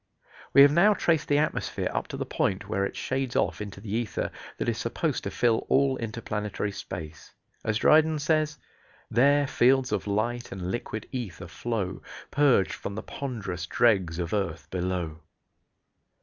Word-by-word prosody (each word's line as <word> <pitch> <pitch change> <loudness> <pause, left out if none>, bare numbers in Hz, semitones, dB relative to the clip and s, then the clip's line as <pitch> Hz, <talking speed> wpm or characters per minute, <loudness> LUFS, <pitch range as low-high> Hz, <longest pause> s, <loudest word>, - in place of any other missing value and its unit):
We 140 - +9
have 140 - +7
now 195 +7 +5
traced 165 -5 +1
the 145 - +3
atmosphere 155 +1 -1
up - - -2
to - - -6
the - - -3
point 95 +1 -1
where 100 -1 0
it 100 - -3
shades 130 -1 -2
off - - +1
into 100 -2 -7
the 100 0 -6
ether 115 -2 -2 0.3
that - - -2
is - - 0
supposed - - -1
to - - -1
fill 115 -2 +1
all 135 0 +3
interplanetary 105 -3 -3
space. 80 -5 -8 0.3
As 105 - 0
Dryden 155 +5 +5
says: 155 0 +1 0.5
There 140 +5 +4
fields 130 0 +3
of - - -1
light 120 +4 -1
and 90 -1 -4
liquid 110 -1 -4
ether 100 -9 -5
flow, 100 +1 -3 0.3
Purg'd 140 -9 +3
from 100 - -6
the 110 - -5
pond'rous 95 -11 -5
dregs 95 -9 +2
of 85 0 -3
earth 85 -7 -2
below. 90 -3 -2
110 Hz, 165 wpm, -27 LUFS, 95-135 Hz, 0.5 s, We